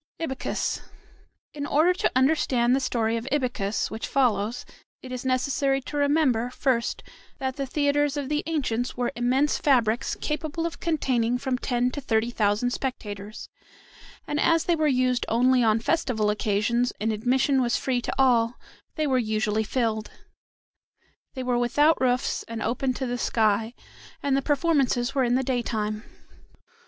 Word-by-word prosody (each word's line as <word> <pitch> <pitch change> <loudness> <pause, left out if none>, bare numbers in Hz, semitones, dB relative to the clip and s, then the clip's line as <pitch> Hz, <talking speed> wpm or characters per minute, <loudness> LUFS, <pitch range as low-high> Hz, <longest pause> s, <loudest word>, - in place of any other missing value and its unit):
IBYCUS 270 -5 -2 0.7
In 290 -1 -4
order 320 +5 +3
to 360 - 0
understand 260 -3 +3
the - - +1
story 230 -3 0
of 230 +3 -6
Ibycus 245 -7 -1
which 220 +1 -4
follows 240 -3 0 0.4
it 255 - -9
is 250 -1 -5
necessary 270 +1 +1
to 280 - -8
remember, 285 -5 +2
first, 250 -2 -1 0.3
that 265 -1 -3
the 275 -1 -3
theatres 290 +1 +1
of 285 -2 -3
the 300 +1 0
ancients 250 -7 -2
were 245 -1 0
immense 255 +5 +1
fabrics 245 -3 +2
capable 310 +2 -3
of 335 -3 -4
containing 250 -8 0
from 260 0 -2
ten 245 0 0
to 285 - -5
thirty 230 -2 0
thousand 215 +2 +1
spectators, 210 -6 -5 0.8
and 295 - -2
as 330 +1 +3
they 345 - +2
were 310 -1 +1
used 255 -2 +2
only 250 +2 +3
on 220 0 +3
festival 225 -6 0
occasions, 215 +4 0
and 220 +1 0
admission 260 +5 +2
was 240 -1 +1
free 255 -2 -1
to - - -3
all, 245 -3 +3 0.4
they 310 - 0
were 260 -3 +2
usually 215 -1 0
filled. 220 -2 -1 1.3
They 260 - -4
were 250 -1 +1
without 290 +7 +3
roofs 250 -1 +1
and 230 -1 -5
open 255 +2 -1
to 265 - -3
the 245 0 -3
sky, 220 +1 +1 0.5
and 280 -1 +2
the 275 - +2
performances 275 -4 +1
were 270 -2 +2
in 245 0 +2
the 265 - +1
daytime. 220 -4 -2
250 Hz, 155 wpm, -25 LUFS, 230-275 Hz, 1.3 s, order